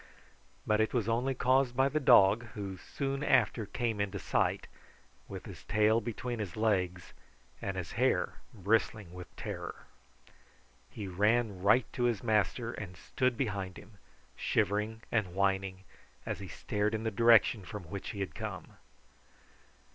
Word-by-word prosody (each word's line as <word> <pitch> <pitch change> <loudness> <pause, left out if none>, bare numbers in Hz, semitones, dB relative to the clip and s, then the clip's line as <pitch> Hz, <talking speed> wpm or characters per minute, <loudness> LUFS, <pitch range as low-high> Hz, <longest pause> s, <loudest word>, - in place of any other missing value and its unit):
But 110 0 +3
it 110 - 0
was 115 -4 +1
only 125 +4 +1
caused 130 0 +2
by 135 +1 +5
the 155 +2 0
dog, 105 -4 +6
who 100 -3 -4
soon 135 +5 -3
after 115 -5 +2
came 115 -3 -1
into 100 -1 -2
sight, - - 0 0.6
with - - -8
his - - -10
tail 110 +2 +3
between 120 +2 -4
his 100 -4 -5
legs, 95 -5 0 0.5
and 95 -1 -3
his 85 -4 -4
hair - - +1
bristling 105 -2 0
with 90 0 -8
terror. - - -6 1.0
He 105 -3 -6
ran 105 +1 +1
right 105 +5 +5
to 120 - 0
his 115 -5 0
master 110 +1 +1
and 95 -6 -7
stood 125 -2 -1
behind 100 -7 -2
him, 105 -1 -15 0.4
shivering 105 +2 0
and 95 -6 0
whining, 95 -1 0 0.4
as - - -3
he 100 - -7
stared 105 +3 -1
in 110 - -3
the 110 - -1
direction 115 -1 +5
from 105 +1 -7
which 95 +4 -6
he 100 - -5
had 95 - -3
come. - - -7
105 Hz, 150 wpm, -32 LUFS, 95-120 Hz, 1.0 s, dog